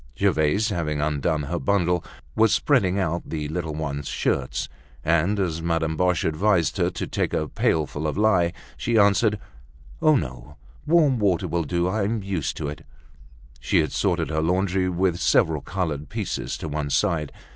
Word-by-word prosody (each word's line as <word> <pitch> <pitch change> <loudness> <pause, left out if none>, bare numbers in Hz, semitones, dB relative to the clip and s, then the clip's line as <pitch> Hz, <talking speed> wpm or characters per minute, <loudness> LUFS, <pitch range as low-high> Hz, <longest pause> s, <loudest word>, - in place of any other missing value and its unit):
Gervaise, 95 +9 +2
having 80 -6 -2
undone 75 +1 0
her 85 +5 -3
bundle, 90 +1 +1 0.3
was 110 -1 +4
spreading 100 -10 +2
out 85 -3 0
the 75 -2 -4
little 80 -2 -3
ones' 75 -2 -4
shirts, 65 -2 -1 0.4
and 85 +5 +2
as 85 -4 -1
Madame 80 -1 0
Boche 90 0 +1
advised 85 0 +1
her - - +2
to - - -4
take - - -2
a 75 - -1
pailful 75 -1 0
of 75 - -3
lye, 95 -5 +3 0.3
she 115 -1 0
answered, 105 +1 +4 0.6
"Oh, 155 -1 +5
no! 65 - -4 0.3
warm 150 -6 +4
water 95 -5 +1
will 85 -2 -1
do. 85 +4 0
I'm 105 +2 -1
used 95 -6 -2
to - - -3
it." 75 +1 -7 0.8
She - - +1
had - - +2
sorted 75 - 0
her 80 0 0
laundry 90 +2 +1
with 90 -1 0
several 80 -3 +2
colored 80 -4 -3
pieces 105 -6 -3
to - - -6
one 75 -1 -3
side. 75 0 0
85 Hz, 165 wpm, -24 LUFS, 75-100 Hz, 0.8 s, Oh